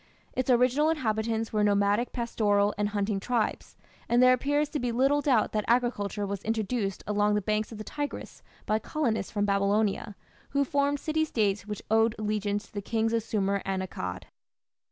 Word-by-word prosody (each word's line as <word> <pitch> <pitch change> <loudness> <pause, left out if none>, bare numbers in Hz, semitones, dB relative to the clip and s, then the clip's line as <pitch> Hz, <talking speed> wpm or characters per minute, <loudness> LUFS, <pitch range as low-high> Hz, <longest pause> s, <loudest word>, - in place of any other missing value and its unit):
Its 255 0 -2
original 255 +5 +4
inhabitants 225 -6 -1
were 210 -1 +2
nomadic 205 +3 +2
pastoral 210 -4 +1
and 205 0 0
hunting 205 -1 -1
tribes, 230 +1 -2 0.3
and 240 - +3
there 255 0 +7
appears 290 +4 +1
to 295 0 -3
be 245 -2 -1
little 270 +5 +2
doubt 260 -6 +2
that 215 -1 0
agriculture 230 -4 0
was 200 -1 -4
introduced 220 -2 -2
along 210 0 +2
the - - +2
banks 215 +2 -1
of 225 - -8
the 215 - -6
Tigris 290 +5 -6 0.2
by 215 +1 +1
colonists 225 -6 -2
from 205 -1 0
Babylonia, 200 +1 +1 0.4
who 280 - +4
formed 285 +1 +1
city 315 +2 0
States 210 -8 0
which 210 -1 -5
owed 225 +1 +3
allegiance 210 -1 -1
to - - -23
the 205 - -3
kings 225 +2 0
of 230 - +2
Sumer 200 -2 -1
and 190 -1 -2
Akkad. 90 - -5
220 Hz, 175 wpm, -28 LUFS, 205-245 Hz, 0.4 s, there